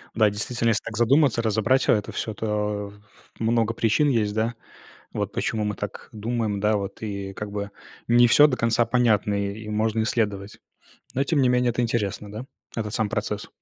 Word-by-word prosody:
Да, 110 -2 +4
действительно, 115 +3 -1
если 115 -1 +1
так 110 -2 -6
задуматься, 130 +1 +3
разобрать 115 +4 +1
это 105 -3 +2
всё, 110 - -3
то 105 -1 -2
ф 105 +1 -22
много 115 0 +1
причин 115 +6 +2
есть, 110 -5 +1
да, 115 +2 -1 0.6
вот, - - -2
почему 110 -1 -1
мы 105 0 -2
так 105 -1 -7
думаем, 110 -1 -2
да, 105 +1 +2
вот, 100 0 -6
и 100 -3 -5
как 105 +1 -6
бы 100 0 -4 0.4
не 120 +1 +6
всё 145 +5 +7
до 130 -4 -1
конца 115 0 +2
понятно, 115 -4 +2
и 100 +2 -3
можно 110 +1 0
исследовать. 105 -3 -2 0.6
Но, 135 +2 +1
тем 150 -1 +1
не 125 - +4
менее, 125 0 +3
это 120 +1 -2
интересно, 105 -3 -2
да, 110 +5 -7 0.3
этот 110 -1 -3
сам 110 -3 0
процесс. 105 -1 -3
110 Hz, 185 wpm, -24 LUFS, 105-120 Hz, 0.6 s, всё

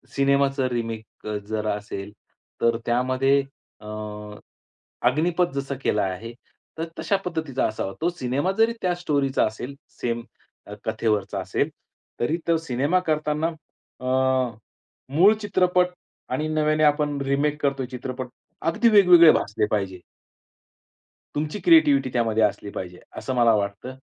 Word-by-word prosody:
सिनेमाचं 140 -1 +2
रिमेक 115 -3 -5 0.2
जर 110 0 -2
असेल 105 -1 -4 0.5
तर 115 0 +3
त्यामध्ये 130 +3 +2 0.4
अ, 105 - -15 1.2
अग्निपथ 170 +6 +1
जसं 140 0 -3
केलं 105 - +2
आहे 95 +5 -4 0.4
तर 165 - -2
तशा 165 +5 +1
पद्धतीचा 160 -7 -1
असावा. 95 -3 -4
तो 170 - +2
सिनेमा 145 +1 -1
जरी 225 +1 +4
त्या 180 -1 +1
स्टोरीचा 145 -6 +1
असेल, 120 +5 -7 0.2
सेम 120 -1 -1 0.6
कथेवरचा 110 -3 -1
असेल. - - -1 0.5
तरी 155 +8 +1
तो 165 -1 +4
सिनेमा 150 +3 0
करतांना 155 0 0 0.5
अ, 130 - -8 1.1
मूळ 190 +7 +7
चित्रपट 180 -3 +2 0.4
आणि 150 +5 -1
नव्याने 155 0 +1
आपण 145 -1 +2
रिमेक 145 +2 0
करतोय 140 -2 0
चित्रपट, 130 0 -5 0.3
अगदी 165 +8 +3
वेगवेगळे 180 -6 +8
भासले 105 +1 0
पाहिजे. 95 -3 -1 1.4
तुमची 150 +6 -2
क्रिएटीव्हीटी 320 -5 +5
त्यामध्ये 115 -2 +2
असली 105 0 0
पाहिजे, 90 -1 -6 0.2
असं 130 - -3
मला 120 -2 +5
वाटतं. 100 +5 -3
140 Hz, 120 wpm, -24 LUFS, 115-160 Hz, 1.4 s, वेगवेगळे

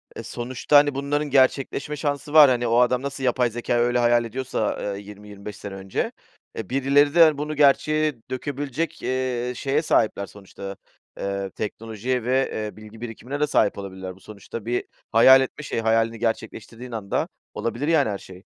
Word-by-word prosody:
e, - - -6
sonuçta, 125 +4 +1
hani, 145 -1 +4
bunların 145 +2 -1
gerçekleşme 135 +2 +2
şansı 145 0 -3
var. 150 -3 +9
Hani, 120 -1 +1
o 115 +1 +3
adam 125 0 +3
nasıl 140 0 -5
yapay 125 -1 +2
zekâyı 120 +1 -1
öyle 120 +1 +2
hayal 120 0 +3
ediyorsa, 125 -2 -2 0.2
eee, - - -7
20-25 105 0 -10
sene 100 -1 -8
önce 95 0 -3 0.5
e, 110 -4 -5
birileri 140 +2 +3
de, 170 - +9
hani, 155 -3 +4
bunu 150 +1 -3
gerçeğe 150 +1 +3 0.2
dökebilecek, 145 +3 -3
eee, 125 -1 -1
şeye 140 +4 0
sahipler 110 -9 +1
sonuçta, 100 0 -9 0.4
eee, 100 0 -3
teknolojiye 115 +4 -3
ve, 130 +3 +1
eee, 105 - -7
bilgi 110 +1 -13
birikimine 120 +4 -6
de 150 - +2
sahip 125 - +2
olabilirler. 95 -2 -7
Bu - - -19
sonuçta 105 +2 -9
bir 120 +1 -1 0.3
hayal 130 +4 +8
etme 135 +3 -4
şeyi, 115 - -2
hayalini 115 0 +1
gerçekleştirdiğin 115 +1 -4
anda 105 -4 -2 0.3
olabilir 120 +5 -3
yani 155 -7 +3
her 100 - -2
şey. 95 -1 -13
120 Hz, 170 wpm, -24 LUFS, 110-140 Hz, 0.5 s, var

